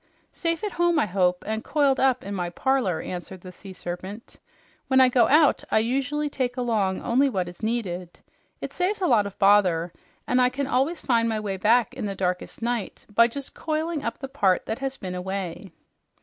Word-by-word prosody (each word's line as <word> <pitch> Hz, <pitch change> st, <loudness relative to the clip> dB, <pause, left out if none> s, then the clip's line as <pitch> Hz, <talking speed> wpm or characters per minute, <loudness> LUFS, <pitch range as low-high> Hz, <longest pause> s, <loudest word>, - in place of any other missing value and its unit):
"Safe 335 Hz, +2 st, -2 dB
at 415 Hz, -, -2 dB
home, 345 Hz, -1 st, +2 dB
I 300 Hz, -, +3 dB
hope, 180 Hz, -2 st, +1 dB
and 220 Hz, +1 st, -3 dB
coiled 280 Hz, -3 st, +2 dB
up 260 Hz, -1 st, +2 dB
in 200 Hz, -, -5 dB
my 180 Hz, -3 st, -2 dB
parlor," 235 Hz, -4 st, 0 dB
answered 180 Hz, +1 st, -7 dB
the 185 Hz, -, -10 dB
Sea 195 Hz, +2 st, -12 dB
Serpent. 185 Hz, +4 st, -8 dB, 0.5 s
"When 265 Hz, -1 st, +4 dB
I 260 Hz, -1 st, +7 dB
go 245 Hz, -1 st, +4 dB
out, 300 Hz, 0 st, +4 dB
I -, -, +2 dB
usually 275 Hz, +6 st, 0 dB
take 255 Hz, -3 st, -2 dB
along 215 Hz, -6 st, 0 dB
only 265 Hz, +4 st, +3 dB
what 185 Hz, -7 st, -2 dB
is 175 Hz, 0 st, -11 dB
needed. 185 Hz, -6 st, -3 dB, 0.4 s
It -, -, -5 dB
saves 370 Hz, +3 st, -1 dB
a 375 Hz, -, 0 dB
lot 225 Hz, -9 st, +3 dB
of 200 Hz, -, -11 dB
bother 185 Hz, -4 st, +3 dB, 0.3 s
and 250 Hz, +1 st, +2 dB
I 250 Hz, -, +4 dB
can 275 Hz, +2 st, -3 dB
always 275 Hz, +6 st, 0 dB
find 230 Hz, -3 st, +2 dB
my 220 Hz, -1 st, -1 dB
way 205 Hz, -2 st, -3 dB
back 230 Hz, +5 st, +3 dB
in 250 Hz, -5 st, -4 dB
the 195 Hz, -, -4 dB
darkest 180 Hz, +4 st, -3 dB
night 235 Hz, -3 st, -3 dB
by 230 Hz, +2 st, +6 dB
just 275 Hz, +3 st, -7 dB
coiling 315 Hz, -1 st, -2 dB
up 230 Hz, -, -3 dB
the 270 Hz, -, -6 dB
part 195 Hz, -8 st, +1 dB
that 220 Hz, -, -4 dB
has 270 Hz, 0 st, -3 dB
been 185 Hz, -1 st, -6 dB
away." 185 Hz, 0 st, -5 dB
230 Hz, 205 wpm, -25 LUFS, 190-270 Hz, 0.5 s, I